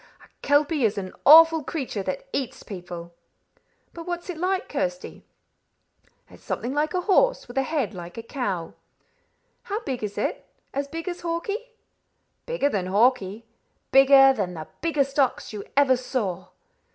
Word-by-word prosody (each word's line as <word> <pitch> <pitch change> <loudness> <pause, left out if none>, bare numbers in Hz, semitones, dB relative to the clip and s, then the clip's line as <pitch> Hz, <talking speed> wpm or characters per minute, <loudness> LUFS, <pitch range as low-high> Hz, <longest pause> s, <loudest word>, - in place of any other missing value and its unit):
"A - - -23
kelpie 290 0 +2
is 215 -1 +1
an 185 -2 -5
awful 325 +1 +8
creature 265 -9 -4
that 190 +7 -4
eats 265 -4 -3
people." 175 -3 -8 0.8
"But 335 0 -9
what 350 -1 -3
is - - -5
it 340 - -9
like, 375 +3 0
Kirsty?" - - -4 1.0
"It's - - -17
something 245 +3 -3
like 300 +3 0
a 365 - +1
horse, 465 +7 +2
with 245 - -11
a 270 - +3
head 270 -6 -2
like 175 0 -9
a 230 - -5
cow." 210 - -3 0.9
"How 415 +3 -4
big 260 - -4
is 205 -1 -4
it? - - -2 0.3
As 280 +1 -2
big 330 +5 -7
as 355 0 -4
Hawkie?" 400 +8 -4 0.7
"Bigger 485 -12 +1
than 190 -7 -2
Hawkie; 215 +1 +2 0.5
bigger 270 0 +7
than 190 -7 -3
the 155 -1 -7
biggest 290 -4 0
ox 265 -4 +1
you 205 -2 -5
ever 275 -2 +5
saw." 220 -8 -3
270 Hz, 160 wpm, -25 LUFS, 210-330 Hz, 1.0 s, awful